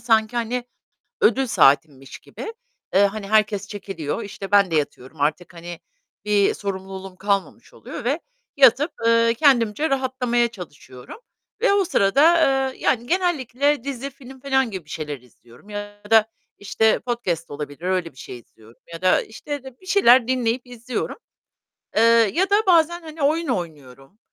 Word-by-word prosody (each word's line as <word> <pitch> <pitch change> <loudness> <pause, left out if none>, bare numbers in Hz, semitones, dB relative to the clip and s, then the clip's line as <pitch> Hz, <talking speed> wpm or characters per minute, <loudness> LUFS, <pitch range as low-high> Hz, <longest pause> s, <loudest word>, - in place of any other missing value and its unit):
sanki 225 -1 +1
hani 240 +1 -2 0.6
ödül 270 0 +3
saatimmiş 135 - +2
gibi, 445 - -9 0.4
eee, 195 - +5
hani 200 0 -6
herkes 210 -1 +1
çekiliyor, 195 -3 -5
işte, 195 -1 -8
ben 200 -2 +4
de 165 - 0
yatıyorum 145 0 -4
artık; 165 +5 -1
hani 170 0 -9 0.4
bir 205 -1 +2
sorumluluğum 190 -1 -6
kalmamış 200 0 -3
oluyor - - -9
ve 280 +7 0 0.4
yatıp, 275 +3 +5 0.2
eee, 230 0 +4
kendimce 245 +1 +2
rahatlamaya 255 -3 0
çalışıyorum 155 - -12 0.4
ve 475 - +3
o 400 -1 +3
sırada, 300 - +4 0.4
eee, - - -18
yani 240 -1 0
genellikle 290 -5 0
dizi, 275 0 -5
film 265 -1 -14
filan 265 -2 +1
gibi 190 -5 -7
bir 150 - -19
şeyler 150 -4 -5
izliyorum 120 - -21
ya 205 0 -8
da, 220 -1 +6 0.3
işte, 220 +2 +1
podcast 230 -10 -3
olabilir. 145 0 -7
Öyle 180 -2 -1
bir - - -31
şey 125 - -9
izliyorum 115 0 -21
ya 165 - -9
da, 185 - +3
işte, 285 +5 -7
de 265 -2 -12
bir 375 - -18
şeyler 255 - +5
dinleyip 250 -1 -1
izliyorum, 245 0 -5 0.8
eee, 220 - +4 0.3
ya 380 +4 +1
da 410 +1 +3
bazen, 345 -1 +3
hani, 315 -1 -8
oyun 315 +3 +1
oynuyorum. 150 - -6
220 Hz, 155 wpm, -22 LUFS, 185-265 Hz, 0.8 s, da